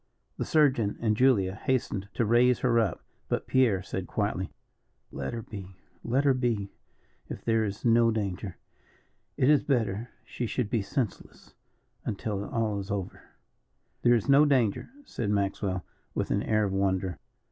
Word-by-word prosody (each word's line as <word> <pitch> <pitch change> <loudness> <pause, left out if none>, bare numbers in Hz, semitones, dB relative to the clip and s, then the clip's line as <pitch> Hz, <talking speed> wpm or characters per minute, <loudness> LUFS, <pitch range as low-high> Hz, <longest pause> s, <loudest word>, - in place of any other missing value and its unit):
The - - -2
surgeon 130 -9 +2
and 110 -2 +1
Julia 105 -7 +3
hastened 105 -4 -1
to 115 - +1
raise 120 +2 +4
her 120 -2 +3
up, 105 -7 -1 0.3
but - - -1
Pierre 115 -8 +2
said 95 0 -4
quietly: 100 -3 -2 0.6
"Let 65 -1 -4
her 115 -1 -5
be 95 -3 -9 0.3
let 130 +4 +1
her 140 -2 +4
be 115 -6 -1 0.6
if - - -7
there 115 -1 +2
is 100 +1 -4
no 115 0 +5
danger. 100 -4 -3 0.8
It 130 - +3
is 150 -1 +5
better 115 -4 -1 0.2
she 120 - -4
should 110 -2 -2
be 115 - +2
senseless 110 +1 -4 0.5
until 105 -2 -3
all 110 -3 -1
is 100 0 -7
over." 100 -3 -4 0.8
"There 120 0 +5
is 110 - -1
no 140 +2 +7
danger," 130 -8 +2 0.2
said 110 - -3
Maxwell, 100 -2 -1 0.3
with - - -1
an 100 - +2
air 110 0 +1
of 100 -2 -1
wonder. 95 -1 0
110 Hz, 160 wpm, -28 LUFS, 100-120 Hz, 0.8 s, no